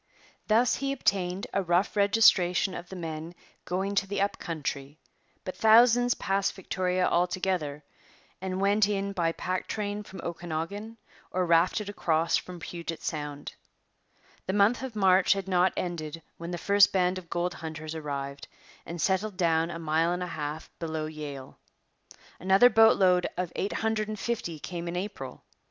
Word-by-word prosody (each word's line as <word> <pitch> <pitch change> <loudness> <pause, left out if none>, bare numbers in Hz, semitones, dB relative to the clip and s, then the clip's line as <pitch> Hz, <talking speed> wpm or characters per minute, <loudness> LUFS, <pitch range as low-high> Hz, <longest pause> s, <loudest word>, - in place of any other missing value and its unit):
Thus 230 +3 +3
he 275 0 -2
obtained 190 -6 0
a 195 - +2
rough 180 +3 +1
registration 200 -3 +4
of 175 0 -7
the 190 - -8
men 165 -1 -6 0.3
going 190 +3 -2
to 200 0 +1
the 200 - -3
up 200 +1 0
country; 145 -3 -4 0.5
but 185 - -5
thousands 240 +2 +5
passed 195 0 0
Victoria 185 -1 0
altogether 175 -4 0 0.6
and 185 0 -3
went 200 +1 +3
in 200 -1 -1
by 170 -3 +1
pack 185 +2 -3
train 205 -1 -3
from 190 -2 -11
Okanagan 175 +6 -5 0.3
or 185 0 0
rafted 175 +5 +2
across 165 -5 +1
from 180 -1 -4
Puget 170 0 -6
Sound. 145 -2 -5 0.9
The 190 - 0
month 205 +4 +3
of 260 -4 -6
March 190 -2 +4
had 195 -1 -5
not 185 0 +3
ended 165 -3 -4
when 170 0 -7
the 175 - -3
first 200 +3 +4
band 185 -1 +1
of 170 -2 -16
gold 175 +1 -1
hunters 155 -1 -6
arrived 140 -3 -5 0.4
and 170 +1 -6
settled 190 +2 0
down 165 -2 +2
a 165 - -5
mile 165 +1 +1
and 180 +1 -2
a 180 - -5
half 150 +1 -5
below 160 -2 -3
Yale. 150 -4 -8 0.8
Another 195 +7 +5
boat 225 0 +6
load 180 -2 +4
of 180 -2 -3
eight 200 - -2
hundred 220 -1 -1
and 215 0 -4
fifty 205 -9 -3
came 170 +2 -6
in 170 - -4
April. 180 -9 -6
180 Hz, 160 wpm, -28 LUFS, 165-200 Hz, 0.9 s, boat